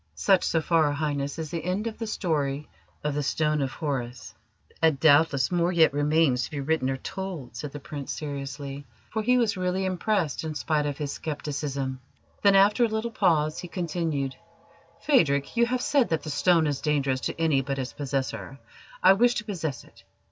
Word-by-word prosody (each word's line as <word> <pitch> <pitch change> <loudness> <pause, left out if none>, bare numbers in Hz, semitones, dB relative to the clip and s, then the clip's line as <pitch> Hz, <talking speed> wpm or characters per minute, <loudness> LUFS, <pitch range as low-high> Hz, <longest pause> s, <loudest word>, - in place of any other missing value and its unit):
Such 195 -2 +3
so 165 - +1
far, 160 -2 +3
Highness, 145 -1 -2
is 160 -2 -5
the 165 -2 -3
end 185 +5 -1
of 225 -1 -5
the 225 - -3
story 150 -8 -1 0.4
of 150 -1 -1
the 145 - -1
Stone 150 +1 0
of 135 -1 -2
Horus." 125 - -4 0.5
"And 160 -4 +3
doubtless 145 -2 +4
more 175 0 +2
yet 165 -5 +4
remains 145 -3 +2
to - - -4
be 150 - -5
written 140 -1 0
or 135 - -1
told," 175 -6 -6
said 140 +4 -5
the 145 - -7
Prince 140 -1 -6
seriously, 140 -1 -6 0.2
for 220 - -1
he 250 +3 +3
was 230 -5 +1
really 185 +1 -1
impressed 185 -4 0
in 155 -1 -4
spite 150 0 0
of 145 -1 -3
his 145 -2 -3
scepticism. 140 -3 -3 0.4
Then, 200 -1 +5
after 205 +5 +5
a - - +4
little 220 +1 -2
pause, 160 -8 +2
he 180 - -6
continued: 165 -6 -2 0.7
"Phadrig, 140 - +3
you 235 0 +4
have 250 +1 -1
said 280 -5 +2
that 160 - -1
the 155 - -4
stone 170 +1 +3
is 145 -2 -1
dangerous 140 -4 +1
to - - -4
any 155 -5 +3
but 135 +1 -3
its 130 -1 -4
possessor. 135 -1 -3 0.5
I 190 - +8
wish 240 +4 +3
to - - -2
possess 165 - -4
it. - - -20
155 Hz, 190 wpm, -26 LUFS, 140-180 Hz, 0.7 s, I